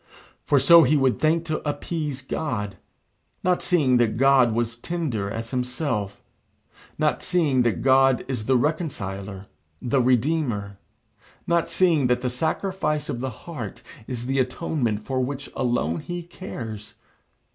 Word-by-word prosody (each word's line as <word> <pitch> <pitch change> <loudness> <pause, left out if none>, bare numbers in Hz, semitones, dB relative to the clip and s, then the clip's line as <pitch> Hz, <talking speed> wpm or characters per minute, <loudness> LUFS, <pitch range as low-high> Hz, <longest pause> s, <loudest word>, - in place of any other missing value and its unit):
For 145 - +2
so 165 +6 +8
he 155 -1 +4
would 135 -2 +2
think 160 +2 +2
to 155 -1 -2
appease 145 -2 -3
God, 110 - -3 0.7
not 180 0 +2
seeing 140 -8 +3
that 115 -2 +1
God 135 -2 +5
was 115 +1 0
as 115 - -8
tender 130 -12 -2
as 115 +2 -5
himself, 125 -5 -2 0.7
not 155 -1 +1
seeing 155 -8 +2
that 120 -2 0
God 135 -1 +4
is 125 -5 -3
the 130 +1 +3
Reconciler, 100 - -3 0.3
the 130 +2 +1
Redeemer, 120 -6 0 0.7
not 170 -1 +1
seeing 165 -8 +3
that 125 0 +1
the 125 -1 -1
sacrifice 155 +1 -1
of 120 - -3
the 130 +1 -2 0.2
heart 125 - -7 0.2
is 120 -2 -4
the 135 +1 0
atonement 125 -5 -1
for 130 -1 -1
which 135 +2 -3
alone 85 -10 0
he 175 -1 -5
cares. 115 - -8
130 Hz, 145 wpm, -24 LUFS, 115-155 Hz, 0.7 s, so